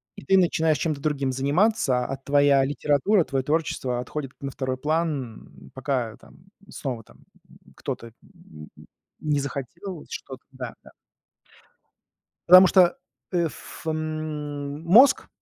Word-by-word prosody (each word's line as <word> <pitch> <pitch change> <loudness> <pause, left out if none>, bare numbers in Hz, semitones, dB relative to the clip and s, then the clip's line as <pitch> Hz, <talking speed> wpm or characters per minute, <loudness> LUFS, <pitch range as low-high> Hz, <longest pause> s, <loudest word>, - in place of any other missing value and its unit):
и - - -11
ты 190 +7 +4
начинаешь 160 -3 +2
чем-то 155 -4 -2
другим 140 -3 -1
заниматься, 140 - +1
а 135 - -3
твоя 140 0 +3
литература, 145 - +2
твоё 135 -2 -2
творчество 145 -5 -1
отходит 135 +2 -5
на 140 0 -5
второй 130 -1 -3
план, 150 -6 -3
пока 130 -4 -2
там 170 - -20 0.2
снова 125 - -5
там - - -21 0.6
кто-то, 115 -1 -6
м, 75 -1 -15 0.5
не 150 -2 0
захотел 150 - -6
что-то 130 -2 -8
Да, 130 -3 -7
да. - - -16 1.6
Потому 185 +1 +10
что, 180 +5 +4 0.3
э, 175 -2 +1
ф 160 - -9
м, 155 -2 -4
мозг- 225 +12 +6
145 Hz, 125 wpm, -25 LUFS, 130-160 Hz, 1.6 s, Потому